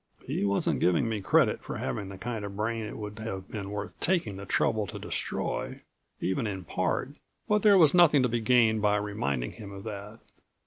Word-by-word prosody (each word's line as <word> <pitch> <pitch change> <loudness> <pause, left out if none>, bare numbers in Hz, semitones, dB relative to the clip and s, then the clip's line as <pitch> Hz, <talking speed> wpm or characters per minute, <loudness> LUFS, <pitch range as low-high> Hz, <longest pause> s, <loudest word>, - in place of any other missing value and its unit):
He - - -2
wasn't 100 0 +1
giving 90 +6 +3
me 110 -2 -2
credit 95 - +3
for - - -6
having 65 +10 -3
the 95 - -8
kind 115 0 -4
of 100 -1 -6
brain 110 +1 -1
it - - -7
would 105 0 -7
have 95 -4 -5
been 100 -3 -5
worth 105 0 -5
taking 165 - +1
the 100 0 -8
trouble 110 0 +1
to - - -7
destroy, - - -3 0.4
even 110 +5 -1
in 95 -3 -4
part, - - -1 0.4
but 210 0 +3
there 205 -1 +6
was 160 -5 +6
nothing 160 -6 +6
to - - +4
be 120 0 -1
gained 110 -2 +4
by 105 0 +3
reminding 85 - -2
him 105 -3 -10
of 100 -1 -9
that. 105 +1 -7
105 Hz, 205 wpm, -28 LUFS, 100-115 Hz, 0.4 s, there